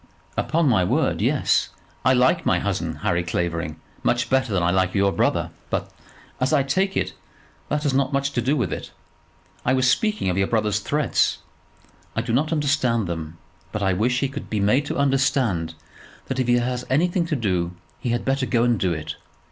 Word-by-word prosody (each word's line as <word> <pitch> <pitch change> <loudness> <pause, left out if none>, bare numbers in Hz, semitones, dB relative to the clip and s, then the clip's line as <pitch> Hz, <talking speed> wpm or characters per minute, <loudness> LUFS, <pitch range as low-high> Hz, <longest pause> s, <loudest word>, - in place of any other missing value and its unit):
"Upon 165 0 +1
my 110 -8 +4
word, 90 - +1
yes. - - +2 0.3
I 130 - +5
like 125 0 +3
my - - +2
cousin, 80 -1 -2
Harry 85 0 +2
Clavering, 85 -2 -2 0.3
much 120 0 0
better 130 -3 +2
than 90 -3 +1
I 85 - +3
like 95 0 +1
your 100 0 +3
brother; - - 0 0.2
but, - - -2 0.5
as 130 +3 +1
I 145 -3 +4
take 190 +8 0
it, - - -1 0.6
that 150 +1 0
has 145 -3 +1
not 135 +1 +1
much 140 0 0
to 125 - -1
do 135 +5 +1
with 110 - -1
it. - - -6 0.7
I 130 - +2
was 130 0 +3
speaking 215 - +1
of 90 +1 +1
your 95 - +2
brother's 105 -2 +1
threats. 150 +7 +1 0.8
I - - 0
do 115 - -2
not 150 +6 +1
understand 140 -7 +1
them; 80 -1 -5 0.3
but 105 - -3
I 95 -1 +2
wish 125 +7 +1
he 140 - +2
could 135 - -7
be 110 - -1
made 125 +9 +2
to - - -3
understand 130 - +1 0.5
that 130 - -3
if 130 - 0
he 120 - +4
has 125 +1 -1
anything 170 +5 +2
to 160 - 0
do, 90 -7 -1 0.2
he 125 - -3
had 120 +1 -1
better 135 -1 0
go 115 -2 +2
and 120 -3 +2
do 90 -2 +1
it. 75 -1 -5
120 Hz, 200 wpm, -23 LUFS, 95-140 Hz, 0.8 s, I